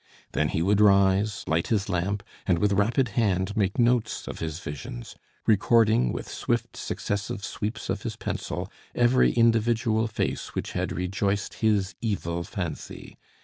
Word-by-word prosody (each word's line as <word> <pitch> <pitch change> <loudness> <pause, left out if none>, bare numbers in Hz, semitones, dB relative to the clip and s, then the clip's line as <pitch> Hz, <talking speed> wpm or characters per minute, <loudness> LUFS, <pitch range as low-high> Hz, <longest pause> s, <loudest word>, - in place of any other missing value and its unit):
Then 75 - +1
he 80 - 0
would 100 +3 +3
rise, 100 0 +4
light 80 +1 0
his 105 -4 0
lamp, 100 +2 -1 0.2
and, 90 - +3
with 100 +3 +2
rapid 115 +6 +2
hand, 100 -2 0
make 100 -3 0
notes 120 -2 +1
of - - -6
his 80 -1 -3
visions; 70 -7 -7 0.3
recording, 110 - +4
with - - -5
swift - - -2
successive 100 -1 -3
sweeps 110 +2 -4
of 95 +1 -2
his 115 -1 -4
pencil, - - -4 0.2
every 120 +1 +4
individual 115 -1 +2
face 110 - -3
which - - -3
had - - -2
rejoiced 100 +3 -1
his 105 -4 +1
evil 85 -6 -2
fancy. 90 -2 -6
100 Hz, 145 wpm, -26 LUFS, 95-110 Hz, 0.3 s, rise